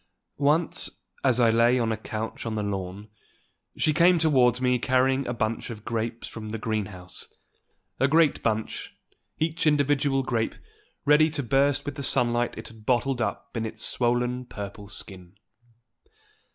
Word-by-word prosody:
Once, 150 +4 +1 0.2
as 130 -2 +3
I 115 -2 +5
lay 120 +2 +4
on 115 -2 +1
a - - +1
couch 110 +1 -5
on 110 - -2
the 105 - -1
lawn, 100 +1 -5 0.7
she 155 - +2
came 175 +2 +5
towards 130 -7 +3
me 125 -1 +2
carrying 130 +2 +2
a - - -1
bunch 110 0 -2
of 110 -2 -8
grapes 115 0 -3
from 110 -1 -7
the 115 - -3
greenhouse, 105 -5 -4 0.7
a 135 - +4
great 155 0 +3
bunch, 110 -1 -2 0.4
each 160 0 0
individual 145 -2 +2
grape 115 -3 -1 0.5
ready 150 +2 +5
to 145 -2 -2
burst 135 +2 +2
with 145 0 -5
the - - -4
sunlight 120 -2 +1
it 110 - -7
had 110 -1 -15
bottled 125 +2 +1
up 110 - -3
in 115 - -1
its 110 - -3
swollen 125 +1 0
purple 100 -1 -7
skin. 95 -3 -7
120 Hz, 155 wpm, -26 LUFS, 110-140 Hz, 0.7 s, I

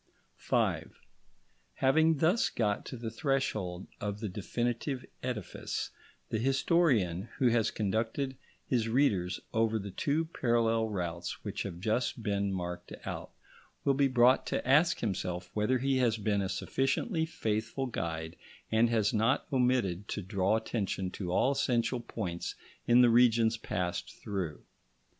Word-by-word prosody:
§ - - -42 0.3
5 - - -1 0.8
Having 160 +4 +4
thus 175 +10 +3
got 105 -3 -1
to 130 - -6
the 115 -1 -5
threshold 110 - -1
of 105 0 -3
the 110 -2 -3
definitive 120 +7 -2 0.2
edifice, 120 -7 -4 0.4
the 110 - -1
historian, 125 - +2
who 125 - +4
has 115 -2 +2
conducted 115 +6 -1 0.3
his 115 -3 0
readers 100 -9 +2
over 115 0 +2
the 100 -2 -5
two 145 - 0
parallel 115 -6 +1
routes 85 -3 -4
which - - -4
have 90 -4 -5
just 115 +4 -1
been 100 -2 0
marked 90 -1 -4
out, - - -5 0.6
will 140 - +4
be 140 0 +3
brought 125 0 +4
to - - -2
ask 150 +6 +4
himself 90 -4 -3
whether 110 +5 +2
he 135 +1 +1
has 120 -3 +2
been 105 -1 0
a 95 - -2
sufficiently 145 - 0
faithful 115 -3 -2
guide 80 -8 -4 0.4
and 115 +1 +4
has 110 -3 +2
not 115 +5 +2
omitted 125 -8 +1
to 105 - -4
draw 95 +3 +1
attention 100 -4 -2
to 90 -3 -4
all 130 +8 +3
essential 125 -3 +1
points 95 -7 -4 0.3
in 120 +1 +7
the 120 - +6
regions 115 -1 +5
passed 90 -5 -3
through. 95 -7 -4
115 Hz, 145 wpm, -31 LUFS, 100-130 Hz, 0.8 s, in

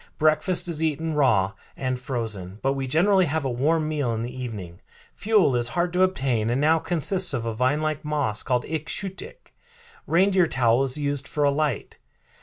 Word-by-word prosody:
Breakfast 155 +4 +1
is 165 -2 -2
eaten 160 0 -1
raw 110 -10 +3 0.3
and 130 -1 -2
frozen, 110 -7 -4
but 135 +1 +2
we 135 -1 -3
generally 185 +6 +3
have 155 0 -1
a 130 - 0
warm 155 +6 +1
meal 145 -7 -1
in 110 - -3
the 125 +2 -6
evening. 105 -9 -7 0.4
Fuel 205 - +3
is 120 -1 +2
hard 175 +6 -1
to 180 - +1
obtain 130 -12 +1
and 120 +3 +1
now 160 +3 +4
consists 175 0 -1
of 115 -2 -3
a 115 - -2
vine 130 +6 +1
like 155 -1 -2
moss 145 -8 -1
called 125 -1 0
ik 160 0 -4
shoot 195 -1 -4
ik. - - -13 0.5
Reindeer 185 +1 +3
tallow 120 -2 +2
is 135 +1 +1
used 145 -1 -2
for 150 - -1
a 140 - +4
light. 145 -5 -2
145 Hz, 195 wpm, -24 LUFS, 125-160 Hz, 0.5 s, now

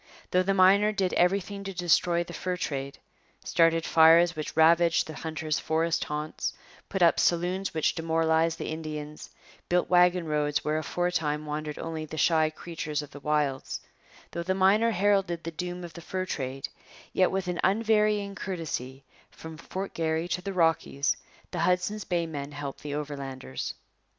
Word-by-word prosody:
Though 180 - +4
the 195 +1 +1
miner 195 +3 +5
did 195 -3 -1
everything 200 +2 +1
to 195 -1 -6
destroy 175 0 +2
the 175 - -10
fur 180 0 -3
trade 140 -4 -4 0.5
started 165 -1 +3
fires 165 +2 +6
which 155 0 -5
ravaged 165 +1 +5
the 155 - -8
hunter's 155 -1 -3
forest 165 +1 0
haunts, 150 +1 -3 0.4
put 190 -2 +1
up 170 - +5
saloons 180 +2 +1
which 160 - +2
demoralized 165 0 +1
the - - -4
Indians, 155 -1 -6 0.4
built 180 +1 +1
wagon 180 -1 +4
roads 150 -2 0
where 155 +1 +1
aforetime 155 -3 -1
wandered 150 0 -4
only 160 -1 -4
the 155 +1 -8
shy 160 -1 +3
creatures 155 -2 -4
of 145 - -12
the 145 - -10
wilds 145 -2 -1 0.5
though 170 - -3
the 185 +2 -1
miner 200 +4 +4
heralded 195 -4 +1
the 165 - -4
doom 180 +2 -5
of 170 -2 -8
the 170 - -9
fur 185 +2 -3
trade 135 -5 -4 0.5
yet 185 - +3
with 190 -1 -2
an 180 -1 -2
unvarying 210 0 +2
courtesy, 150 -9 -5 0.3
from 160 0 -10
Fort 190 +4 -6
Garry 160 +1 -1
to 180 - -1
the 195 - -4
Rockies, 165 -5 +1 0.4
the 175 - -4
Hudson's 180 +4 0
Bay 175 -2 0
men 145 -3 -6
helped 145 -1 -6
the 145 -1 -4
Overlanders. 135 - -5
165 Hz, 165 wpm, -28 LUFS, 155-180 Hz, 0.5 s, fires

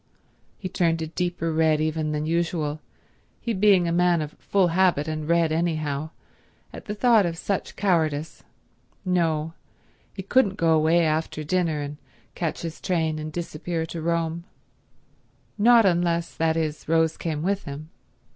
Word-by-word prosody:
He 190 - -5
turned 170 -2 +1
a - - -2
deeper 165 0 -2
red 160 -1 +3
even 155 0 -1
than 150 0 -2
usual, 160 -2 -1 0.6
he 235 - -2
being 190 -3 +4
a - - 0
man 175 0 +3
of 150 - -7
full 190 -3 +2
habit 170 -4 +2
and 155 0 -4
red 170 -1 +3
anyhow, 155 -3 -1 0.6
at - - -9
the 210 - -4
thought 230 -1 +4
of 170 -2 -2
such 195 +2 -3
cowardice. 160 -6 0 0.6
No, 165 -3 0 0.6
he 190 - -6
couldn't 200 -1 +2
go 165 -3 +3
away 160 +2 +3
after 155 0 -1
dinner 160 -1 0
and 145 0 -6 0.4
catch 165 -2 -3
his 165 -1 -6
train 160 -4 0
and 155 0 -5
disappear 165 0 -4
to 165 0 -6
Rome; 170 0 -1 1.1
not 230 +1 +5
unless, 170 -2 +1
that 160 0 0
is, 155 -1 -3
Rose 160 0 +2
came 155 -2 -3
with 195 +2 -1
him. 150 +2 -8
165 Hz, 155 wpm, -24 LUFS, 155-180 Hz, 1.1 s, not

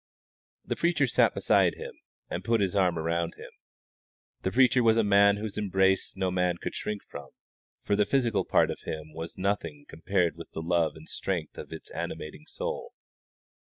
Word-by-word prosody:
The - - -2
preacher 170 -5 +2
sat 125 - +3
beside - - +3
him, - - -8 0.3
and 90 - -4
put 115 +2 +2
his 100 -1 0
arm 90 -4 +3
around 85 +1 -1
him. - - -11 0.9
The 95 - -1
preacher 125 +1 +5
was 115 -1 +4
a 115 - +4
man 100 0 +5
whose 105 0 -4
embrace 95 -2 +1
no 95 -1 0
man 90 -1 +1
could - - -5
shrink 105 -1 -4
from, - - -10 0.5
for 100 - +1
the 105 0 +2
physical 120 -3 +2
part - - +3
of - - -6
him 80 -1 -6
was 80 +1 -6
as - - -25
nothing 95 -7 -2
compared 85 0 0
with 85 - -9
the 80 - -4
love 85 -2 +1
and 80 0 -13
strength 85 -5 -3
of - - -8
its 80 - -8
animating 150 - -6
soul. 485 -1 -5
95 Hz, 185 wpm, -28 LUFS, 85-105 Hz, 0.9 s, preacher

